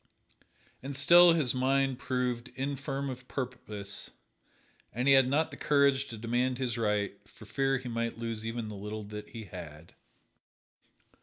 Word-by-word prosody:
And 135 +1 -6
still 170 +5 +7
his 150 -7 +1
mind 135 0 +1
proved 125 -3 -1
infirm 135 +1 -3
of 125 -1 -7
purpose, 110 -6 -5 0.8
and 125 +5 -2
he 140 - +7
had 135 -1 +6
not 155 +4 +1
the - - -9
courage 140 -2 +3
to 115 - -8
demand 120 +3 0
his 125 -3 -2
right, 105 -3 0 0.2
for - - -14
fear 135 0 +1
he 130 -1 -7
might 115 -1 -2
lose 115 -1 -4
even 115 0 -4
the 105 - -7
little 105 +2 -6
that 105 +1 -8
he 115 -1 -8
had. 85 -5 -10
125 Hz, 155 wpm, -30 LUFS, 110-135 Hz, 0.8 s, still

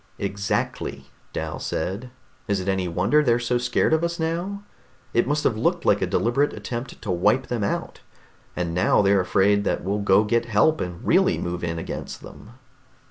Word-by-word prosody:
"Exactly," 100 +1 -3 0.2
Dal - - -4
said. 100 +10 -3 0.4
"Is 100 -2 +1
it 95 - -5
any 95 -2 0
wonder 95 - +2
they're 120 -5 +3
so 120 0 0
scared 125 +5 +1
of 160 +1 +2
us 170 0 -2
now? 175 +5 -2 0.5
It 120 - +2
must 150 +2 0
have 115 - +2
looked 110 - 0
like - - +3
a - - +1
deliberate 135 +5 +1
attempt 120 +1 -6
to 105 - -2
wipe 95 +9 +2
them 120 -4 -1
out, 100 - -3 0.6
and 85 -2 -2
now 90 +3 +3
they're 100 -1 +4
afraid 100 +2 +2
that - - -1
we'll 100 +2 -1
go 100 0 +4
get 115 +2 +1
help 120 +8 +2
and 90 -1 -5
really - - +3
move 85 0 -4
in 85 -1 -2
against 80 - -6
them." 110 - -12
105 Hz, 185 wpm, -24 LUFS, 95-125 Hz, 0.6 s, they're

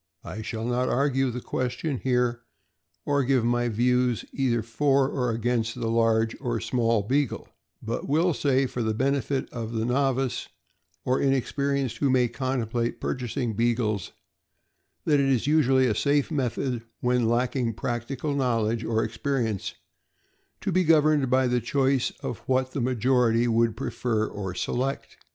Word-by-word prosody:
I 110 - -6
shall 110 0 -4
not 125 +1 0
argue 135 0 +1
the 125 +1 -5
question 130 +3 -2
here, 125 -2 0 0.6
or 140 -1 +2
give 130 -2 +2
my 120 0 +1
views 125 +1 +1
either 120 -4 0
for 135 +4 +2
or 125 -3 -1
against 115 0 -1
the 115 - -1
large 115 -1 +2
or 120 -4 -1
small 115 -4 +1
Beagle, 135 +4 -1 0.4
but 115 +4 -4
will 165 +4 +3
say, 135 -2 +2
for 125 -1 -4
the 110 -1 0
benefit 135 +1 0
of 115 -1 -5
the 110 0 -1
novice, 135 0 0 0.6
or 130 +1 +2
inex 135 -2 +1
perienced 140 -3 -1
who 140 - +2
may 125 -1 +3
contemplate 120 -2 -2
purchasing 125 -2 -2
Beagles, 110 -3 0 0.9
that 150 -2 +3
it 135 -1 +2
is 130 -4 +1
usually 135 -3 +4
a 120 - +2
safe 145 +7 +1
method, 130 -3 -1 0.2
when 125 -2 +2
lacking 120 0 0
practical 125 +5 -3
knowledge 115 -4 0
or 110 0 0
experience, 115 -2 -2 0.9
to 195 - -1
be 185 +1 +3
governed 155 -4 +4
by 130 +1 +3
the 125 -1 +1
choice 135 +1 +1
of 120 - -4
what 130 0 +1
the 135 - -3
majority 120 -1 +2
would 115 -1 +2
prefer 115 -2 -1
or 95 -4 -5
select. 135 +7 -3
125 Hz, 150 wpm, -26 LUFS, 115-135 Hz, 0.9 s, usually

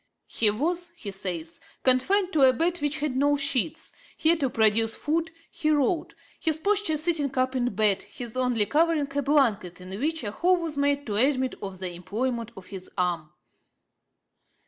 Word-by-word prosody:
'He 220 - +1
was,' 340 +11 -1
he 210 -11 -6
says, 175 -4 -3 0.2
'confined 365 +10 +3
to 305 - +2
a 260 -1 +7
bed 340 +7 0
which 290 0 -1
had 295 -4 -1
no 290 +2 +3
sheets; 280 0 0 0.3
here, 325 +2 +4
to 275 -4 0
procure 225 -1 +3
food, 320 +8 -2 0.2
he 310 - -1
wrote; 310 +3 +1 0.2
his 315 -1 +2
posture 400 -2 +1
sitting 300 -4 -1
up 255 +1 +1
in 245 -4 -1
bed, 205 -2 +2
his 240 -2 -8
only 250 -4 +1
covering 300 0 +1
a 285 - +2
blanket, 235 - +1
in 180 0 -11
which 315 +2 -1
a 205 - -3
hole 360 - +2
was 330 -3 -4
made 285 0 +1
to 205 -3 -2
admit 260 +1 +2
of 195 -1 -6
the 185 -1 -4
employment 230 +7 -3
of 190 - -10
his 190 -2 -9
arm.' 175 -4 -1
265 Hz, 175 wpm, -26 LUFS, 215-310 Hz, 0.3 s, a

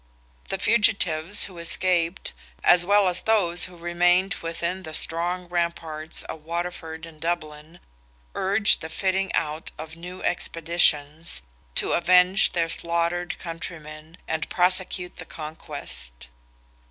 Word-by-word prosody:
The 195 - -1
fugitives 200 -5 +3
who 180 -4 -4
escaped, 170 +1 +1 0.3
as 175 0 +6
well 200 +1 +4
as 180 0 +1
those 185 -6 +3
who 180 -1 -12
remained 175 +3 +2
within 170 +2 -3
the 160 -3 -6
strong 175 +2 -1
ramparts 170 -2 -3
of 155 - -8
Waterford 170 -1 -5
and 155 -2 -15
Dublin, 160 -1 -4 0.5
urged 200 +2 +3
the 160 - -6
fitting 190 +1 0
out 155 0 -2
of 160 +1 -8
new 180 +2 -9
expeditions, 165 - +1 0.3
to - - +1
avenge 180 +2 +5
their 170 -2 +1
slaughtered 170 +1 -1
countrymen 160 -1 -8
and 160 -1 -2
prosecute 180 0 0
the 165 - -7
conquest. 140 - -5
170 Hz, 120 wpm, -24 LUFS, 160-180 Hz, 0.5 s, as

